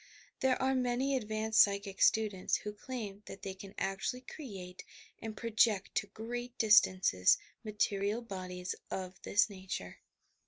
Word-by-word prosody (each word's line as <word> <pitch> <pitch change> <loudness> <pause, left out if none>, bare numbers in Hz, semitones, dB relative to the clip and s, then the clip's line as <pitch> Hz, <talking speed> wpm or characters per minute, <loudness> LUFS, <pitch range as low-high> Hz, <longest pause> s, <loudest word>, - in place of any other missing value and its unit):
There 260 -1 +2
are 265 0 +2
many 255 +2 +1
advanced 215 -2 +3
psychic 200 -1 +1
students 210 -4 +3
who 210 - -4
claim 210 -3 -6
that 195 - -9
they 195 - -4
can 195 +1 -11
actually 195 +6 -2
create 195 - -8 0.4
and 220 -1 -6
project 220 -3 +2
to 200 - 0
great 240 +4 -6
distances 185 - +5 0.3
material 210 +1 0
bodies 185 -3 -5 0.2
of 185 -1 -5
this 205 - +3
nature. 185 - -6
210 Hz, 130 wpm, -33 LUFS, 195-235 Hz, 0.4 s, distances